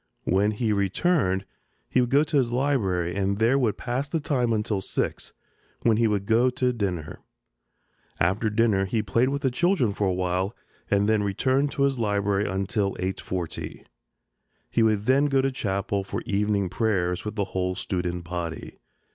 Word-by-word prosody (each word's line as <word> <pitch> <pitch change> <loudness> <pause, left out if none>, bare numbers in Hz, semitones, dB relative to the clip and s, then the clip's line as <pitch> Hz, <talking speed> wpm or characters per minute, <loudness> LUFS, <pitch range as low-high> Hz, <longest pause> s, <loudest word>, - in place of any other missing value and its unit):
When 100 +3 +2
he 110 +1 0
returned 100 - +1 0.4
he 130 - +2
would 125 - 0
go 140 +3 +4
to 155 -1 0
his 125 -3 +2
library 100 -10 0
and 100 0 0
there 115 +5 +3
would 110 -6 +1
pass 130 +4 -2
the 165 - 0
time 130 -5 0
until 105 -2 0
six, - - -3 0.5
when 115 -2 +4
he 115 0 +3
would 100 -2 0
go 115 +4 +4
to 125 0 0
dinner. 90 -9 -3 1.0
After 95 +7 +1
dinner 105 -3 +2
he 110 +3 -1
played 115 +5 +2
with 140 +1 -3
the 130 - +2
children 140 - +2
for 100 0 0
a - - +2
while 90 +2 -1 0.3
and 100 0 +2
then 110 -1 +3
returned 130 +8 +1
to 140 - 0
his 135 -2 +1
library 100 -2 0
until 100 +1 -1
8.40. 90 -2 -4 0.9
He 115 - +2
would 110 -2 +2
then 135 +4 +4
go 135 -1 +2
to 135 0 +1
Chapel 100 -4 -2
for 95 - -4
evening 100 -1 +1
prayers 90 -3 0
with 105 0 -5
the 100 -3 0
whole 90 0 -1
student 90 -2 -3
body. 85 -1 -5
105 Hz, 170 wpm, -25 LUFS, 95-125 Hz, 1.0 s, go